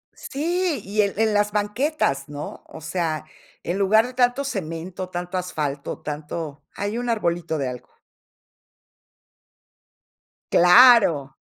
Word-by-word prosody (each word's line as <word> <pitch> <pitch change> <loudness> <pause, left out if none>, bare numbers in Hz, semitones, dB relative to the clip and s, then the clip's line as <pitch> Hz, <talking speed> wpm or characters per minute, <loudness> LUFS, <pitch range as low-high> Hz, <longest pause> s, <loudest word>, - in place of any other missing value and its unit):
Sí, 330 - -2
y 210 +2 0
en 200 -1 0
en 220 -1 +2
las 210 0 +2
banquetas, 210 - -1
¿no? 145 0 -7
O - - -11
sea, 160 -2 -2 0.4
en 175 +3 -2
lugar 215 +3 +4
de 250 - -7
tanto 245 +2 +2
cemento, 180 - -5
tanto 180 +1 -4
asfalto, 150 -6 -4
tanto 150 0 -6
ahí 205 +3 -3
un 245 0 -3
arbolito 170 -7 -1
de 135 -3 -2
algo. 125 0 -10 2.6
Claro. 175 - +6
185 Hz, 120 wpm, -23 LUFS, 155-230 Hz, 2.6 s, Claro